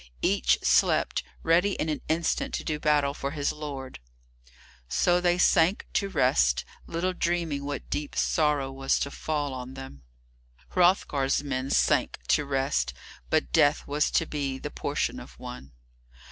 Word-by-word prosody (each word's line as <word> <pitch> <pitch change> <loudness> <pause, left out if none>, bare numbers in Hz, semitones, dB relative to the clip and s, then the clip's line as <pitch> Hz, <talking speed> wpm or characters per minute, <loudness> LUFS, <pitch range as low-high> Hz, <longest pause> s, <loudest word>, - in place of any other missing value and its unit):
Each - - +3
slept, - - +3 0.2
ready 180 +5 +3
in 160 - -2
an 155 -2 -2
instant 160 +1 0
to - - -4
do 150 -1 -2
battle 145 -2 +2
for 140 - -4
his 145 -1 -1
lord. 140 - -7 0.9
So 175 - +2
they 175 0 +2
sank 175 +1 +3
to 200 - 0
rest, 65 - +2 0.2
little 180 +3 -1
dreaming 170 -5 -1
what 145 -1 -5
deep 145 0 -3
sorrow 150 -4 +1
was 135 0 0
to 140 - -2
fall 145 -3 -2
on 130 0 -7
them. 135 - -9 0.7
Hrothgar's 150 -7 +2
men 135 -1 -3
sank - - +2
to 150 - +3
rest, 135 - 0 0.3
but 65 0 +1
death 145 +1 +3
was 145 +1 +1
to 165 - +1
be 140 -4 -3
the - - -6
portion - - -2
of - - -13
one. 65 +2 -9
145 Hz, 150 wpm, -27 LUFS, 135-160 Hz, 0.9 s, Each